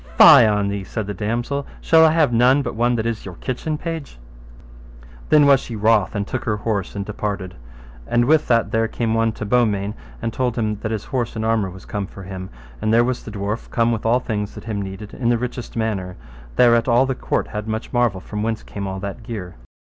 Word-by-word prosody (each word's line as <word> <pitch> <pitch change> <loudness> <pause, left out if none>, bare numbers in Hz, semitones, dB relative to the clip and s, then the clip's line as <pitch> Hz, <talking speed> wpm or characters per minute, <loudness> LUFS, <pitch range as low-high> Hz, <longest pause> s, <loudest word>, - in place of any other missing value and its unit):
Fie - - +9
on 105 -1 +1
thee, 100 -1 -3
said 110 +2 -4
the 105 - -4
damosel, 120 +8 -2
shall 160 -1 +5
I 160 - +7
have 155 -6 +3
none 125 +4 +4
but - - -3
one 120 +2 +1
that 110 -1 -1
is 115 -2 -2
your 95 -3 -8
kitchen 150 - -3
page? 160 - -6 1.1
Then 150 -1 +6
was 140 -1 +6
she 120 - -7
wroth 110 -3 +2
and 100 -1 -1
took 130 +4 -4
her 105 -2 0
horse 105 -3 -2
and 100 -1 -3
departed. 100 -3 -4 0.5
And 120 0 +2
with 155 +3 +3
that 115 -1 +2
there 115 0 +2
came 115 0 -2
one 115 0 +2
to 110 - -6
Beaumains 105 -3 +1 0.3
and 115 -1 -3
told 125 -2 -1
him 105 -2 -1
his 110 -1 -3
horse 125 -5 -2
and 110 0 -2
armour 110 -4 +1
was 95 +1 -12
come 100 -2 -4
for 100 - -11
him; 95 0 -7 0.3
and 110 - +1
there 115 +1 +5
was 125 0 -1
the - - -8
dwarf 105 +2 -4
come 115 0 +2
with 115 -2 -2
all 115 +3 +3
thing 105 -4 -2
that - - -9
him 110 -3 -3
needed, 95 +2 -7
in 120 -2 -1
the 120 - +3
richest 125 0 -5
manner; 100 -5 -2 0.4
thereat 120 -1 +4
all 120 +2 +4
the 130 - -1
court - - -2
had 105 +1 -5
much 110 +1 -4
marvel 120 -6 +2
from 105 +2 -6
whence 110 0 -2
came 100 -1 -6
all 95 0 -4
that 100 +3 -5
gear. 105 -6 -6
110 Hz, 225 wpm, -21 LUFS, 100-120 Hz, 1.1 s, Fie